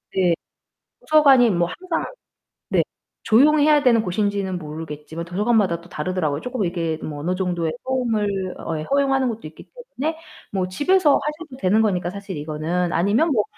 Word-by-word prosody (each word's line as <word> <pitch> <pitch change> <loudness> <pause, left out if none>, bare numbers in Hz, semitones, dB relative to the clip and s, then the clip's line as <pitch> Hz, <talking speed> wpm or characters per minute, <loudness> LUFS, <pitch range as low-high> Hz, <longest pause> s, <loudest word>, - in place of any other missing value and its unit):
네. 180 -3 +3 0.7
도서관이 275 -6 +5
뭐 175 -3 +1
항상 360 - -3 0.6
네. - - +3 0.4
조용히 290 +6 +5
해야 300 -1 +5
되는 235 -4 +4
곳인지는 200 -1 -1
모르겠지만 155 0 -7
도서관마다 195 -1 +1
또 170 - -16
다르더라고요. 155 -3 -2
쪼끔 250 +1 -3
이게 165 -3 -2
뭐 150 -2 -5
어느 175 +5 -1
정도의 175 -3 -1
소음을 240 -5 0 0.3
어 160 - -3
허용하는 270 - +1
것도 225 -6 -5
있기 155 - -16 0.3
때문에 320 +3 -1 0.3
뭐 185 -2 -1
집에서 310 - +3
하셔도 300 -2 -6
되는 210 0 +3
거니까, 180 -5 0
사실 200 -1 -7
이거는. 160 +4 -2
아니면 210 - +2
뭐 215 -5 +2
195 Hz, 365 characters per minute, -22 LUFS, 170-260 Hz, 0.7 s, 도서관이